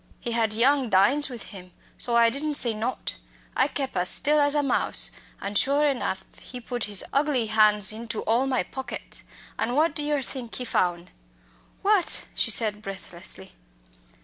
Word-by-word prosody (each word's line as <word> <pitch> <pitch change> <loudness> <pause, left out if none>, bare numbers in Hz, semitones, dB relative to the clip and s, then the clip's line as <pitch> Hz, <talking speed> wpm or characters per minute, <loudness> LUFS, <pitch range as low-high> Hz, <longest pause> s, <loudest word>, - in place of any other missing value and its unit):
He 240 - -5
had 230 -2 0
young 260 +2 +2
Dynes 250 +10 +2
with 240 -5 -8
him 180 -2 -12 0.2
so 235 - +3
I 230 -1 +4
didn't 295 +3 -2
say 235 -4 +1
nought 225 +4 -4 0.4
I 260 - +2
kep' 275 -4 -5
as 180 0 +2
still 300 +2 +5
as 290 0 +2
a 295 - +1
mouse, 275 - +3 0.3
an' 200 +1 -5
sure 280 +7 +2
enough 245 -9 -2 0.2
he 250 - -9
put 240 0 -3
his 205 -2 +1
ugly 280 -4 +1
han's 215 -1 +3
into 230 0 -6
all 240 +4 0
my 260 -2 0
pockets. 265 -1 -4 0.3
An' 245 - -1
what 310 +1 +2
do 310 - -2
yer 295 -2 -1
think 245 -2 -5
he 250 - -4
foun'?" 175 -5 -2 0.7
"What?" 400 -3 +3
she - - +1
said 210 -2 +2
breathlessly. 180 - -9
240 Hz, 175 wpm, -24 LUFS, 210-280 Hz, 0.7 s, still